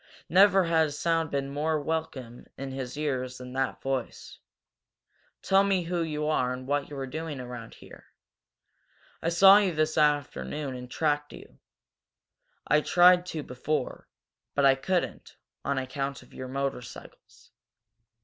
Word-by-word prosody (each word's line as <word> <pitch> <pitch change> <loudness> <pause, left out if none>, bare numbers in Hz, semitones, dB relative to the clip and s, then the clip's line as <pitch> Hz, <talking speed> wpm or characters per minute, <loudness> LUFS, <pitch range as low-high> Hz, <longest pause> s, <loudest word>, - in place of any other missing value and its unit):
Never 195 +3 +6
had 165 -2 +3
a - - -6
sound 165 +2 0
been 140 -1 -2
more 155 +2 0
welcome 145 -6 -4
in 135 0 -5
his 130 0 -6
ears 130 -4 -2
than 125 0 -9
that 135 0 -2
voice. 135 -2 -4 1.0
"Tell 195 +1 +4
me 195 -2 +1
who 170 0 -2
you 150 -2 -2
are 140 -5 +1
and 130 0 -7
what 145 +1 0
you - - -18
two 145 - -9
were 135 -1 -4
doing 150 +1 -5
around 125 -2 -8
here. - - -15 1.1
I 165 - 0
saw 195 +4 +8
you 195 -4 +1
this 155 0 +1
afternoon 145 - 0
and 125 -1 -8
tracked 150 0 -1
you. - - -14 1.1
I 150 - +3
tried 180 +2 +5
to 155 -4 -4
before, 130 +2 -3 0.5
but 140 - +3
I 135 - +7
couldn't, 175 +7 -3 0.3
on 140 -1 -1
account 135 0 -3
of - - -21
your 130 - -7
motorcycles. 135 -2 -7
145 Hz, 150 wpm, -28 LUFS, 130-160 Hz, 1.1 s, saw